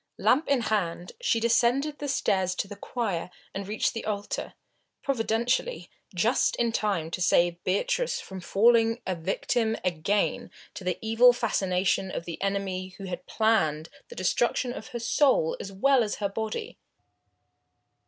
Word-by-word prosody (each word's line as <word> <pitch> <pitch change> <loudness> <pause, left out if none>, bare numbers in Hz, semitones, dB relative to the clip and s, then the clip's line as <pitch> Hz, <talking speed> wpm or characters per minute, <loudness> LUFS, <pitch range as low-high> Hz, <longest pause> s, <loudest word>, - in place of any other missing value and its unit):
Lamp 285 +6 +3
in 275 -3 +2
hand 180 -6 -1
she 230 - +2
descended 245 +6 +2
the 290 - -4
stairs 190 -9 +1
to 195 - -2
the 205 - -8
choir 200 -5 -3 0.2
and 195 0 -5
reached 215 +2 0
the 225 - -5
altar, 205 -1 -4 0.5
providentially, 245 - -1 0.2
just - - +2
in 235 -1 +1
time 195 -8 -1
to 180 - -4
save 175 0 +2
Beatrice - - 0
from 190 -1 -8
falling 230 +4 +3
a 190 - -1
victim 220 +6 -1
again 180 +4 0 0.2
to - - -8
the 180 -1 -1
evil 230 +3 +6
fascination 190 -5 0
of 170 - -5
the 170 - -7
enemy 190 -2 -2
who 195 - -9
had 185 -2 -6
planned 165 -9 +1 0.2
the - - -10
destruction 240 +6 0
of 220 - -8
her 240 - -5
soul 245 - +2
as 195 - -6
well 255 +6 +3
as 210 - -2
of - - -6
her 200 - +1
body. 220 - -4
210 Hz, 155 wpm, -27 LUFS, 185-235 Hz, 0.5 s, evil